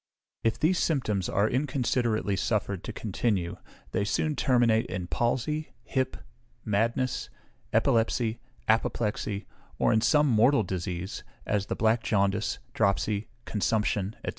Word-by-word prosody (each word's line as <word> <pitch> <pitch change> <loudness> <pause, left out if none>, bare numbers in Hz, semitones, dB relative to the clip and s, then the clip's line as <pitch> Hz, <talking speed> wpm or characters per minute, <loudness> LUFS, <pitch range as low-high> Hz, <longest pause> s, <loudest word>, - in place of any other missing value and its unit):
If 115 - +1
these 170 +3 +3
symptoms 110 - 0
are 100 +2 +2
inconsiderately 125 -5 0
suffered 100 -2 -1
to - - -4
continue, 100 -4 -1 0.3
they 100 - 0
soon 150 +9 0
terminate 120 -3 +3
in 90 -2 -4
palsy, 130 - -1
hip, 130 -1 -1 0.5
madness, 115 +4 0 0.4
epilepsy, 115 0 +2 0.3
apoplexy, 105 -2 0 0.3
or - - +3
in 110 - +3
some 150 +5 +4
mortal 125 +3 +4
disease, 90 0 -4 0.2
as 100 -2 0
the - - -2
black 110 +1 +2
jaundice, 100 0 +1 0.2
dropsy, 100 0 +1 0.2
consumption, 105 -1 0
&c. - - -1
110 Hz, 120 wpm, -28 LUFS, 100-125 Hz, 0.5 s, some